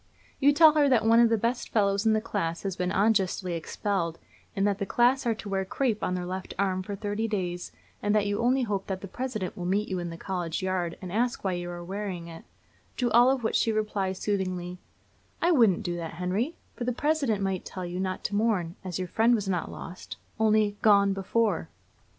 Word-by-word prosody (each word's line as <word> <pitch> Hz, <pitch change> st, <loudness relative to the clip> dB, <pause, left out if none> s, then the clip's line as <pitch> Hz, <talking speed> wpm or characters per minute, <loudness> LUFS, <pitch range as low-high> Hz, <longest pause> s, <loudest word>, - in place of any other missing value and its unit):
You 285 Hz, +1 st, +5 dB
tell 310 Hz, +2 st, +7 dB
her 295 Hz, -2 st, +4 dB
that 230 Hz, -4 st, +3 dB
one 230 Hz, +1 st, +6 dB
of 235 Hz, -1 st, +6 dB
the 225 Hz, -, +3 dB
best 235 Hz, +3 st, -1 dB
fellows 200 Hz, 0 st, +2 dB
in 220 Hz, -, +5 dB
the 215 Hz, -, +3 dB
class 195 Hz, -7 st, -3 dB
has 195 Hz, -2 st, -2 dB
been 180 Hz, 0 st, -1 dB
unjustly 195 Hz, -3 st, +1 dB
expelled, 170 Hz, 0 st, -2 dB, 0.4 s
and 195 Hz, 0 st, +1 dB
that 200 Hz, -1 st, +1 dB
the 200 Hz, -, -1 dB
class 245 Hz, +4 st, +3 dB
are 230 Hz, -, +2 dB
to 215 Hz, -, -9 dB
wear 195 Hz, -1 st, 0 dB
crape 220 Hz, +2 st, -1 dB
on 180 Hz, -, 0 dB
their 180 Hz, -1 st, -3 dB
left 185 Hz, +1 st, -5 dB
arms 185 Hz, -1 st, 0 dB
for 205 Hz, -, -3 dB
thirty 205 Hz, +2 st, -2 dB
days, 180 Hz, -4 st, -3 dB, 0.3 s
and 205 Hz, +1 st, +1 dB
that 210 Hz, -1 st, +3 dB
you 205 Hz, 0 st, -1 dB
only 255 Hz, +2 st, +2 dB
hope 200 Hz, -4 st, -2 dB
that 190 Hz, -1 st, -3 dB
the 195 Hz, -, -6 dB
President 215 Hz, -3 st, -4 dB
will 175 Hz, -1 st, -4 dB
meet 205 Hz, +3 st, 0 dB
you 185 Hz, -1 st, -2 dB
in 175 Hz, -1 st, -4 dB
the 165 Hz, -, -7 dB
college 175 Hz, -2 st, -3 dB
yard 180 Hz, -2 st, -1 dB
and 180 Hz, -, -6 dB
ask 240 Hz, +4 st, 0 dB
why 190 Hz, -, 0 dB
you 175 Hz, -1 st, -3 dB
wear 200 Hz, +3 st, -4 dB
it; 170 Hz, -2 st, -7 dB, 0.5 s
to 245 Hz, -2 st, 0 dB
all 240 Hz, +2 st, +6 dB
of 265 Hz, -2 st, 0 dB
which 220 Hz, -, 0 dB
she 225 Hz, -, +2 dB
replies 205 Hz, -3 st, -1 dB
soothingly, 185 Hz, -3 st, -2 dB, 0.6 s
'I 345 Hz, -, +3 dB
wouldn't 225 Hz, -, +4 dB
do 175 Hz, -1 st, -2 dB
that, 165 Hz, -1 st, -6 dB
Henry; 190 Hz, -, -1 dB, 0.2 s
for -, -, -5 dB
the 250 Hz, -, 0 dB
President 275 Hz, -7 st, 0 dB
might 190 Hz, -2 st, -1 dB
tell 185 Hz, -1 st, -6 dB
you 175 Hz, +1 st, -4 dB
not 185 Hz, 0 st, -3 dB
to -, -, -3 dB
mourn, 200 Hz, -6 st, +1 dB
as 185 Hz, -3 st, -4 dB
your 185 Hz, -1 st, -3 dB
friend 225 Hz, +6 st, +3 dB
was 205 Hz, -3 st, -2 dB
not 180 Hz, -3 st, -1 dB
lost, 180 Hz, +3 st, -8 dB, 0.2 s
only 215 Hz, -2 st, +3 dB
gone 200 Hz, -2 st, +5 dB
before.' 195 Hz, -, 0 dB
200 Hz, 220 wpm, -27 LUFS, 185-225 Hz, 0.6 s, tell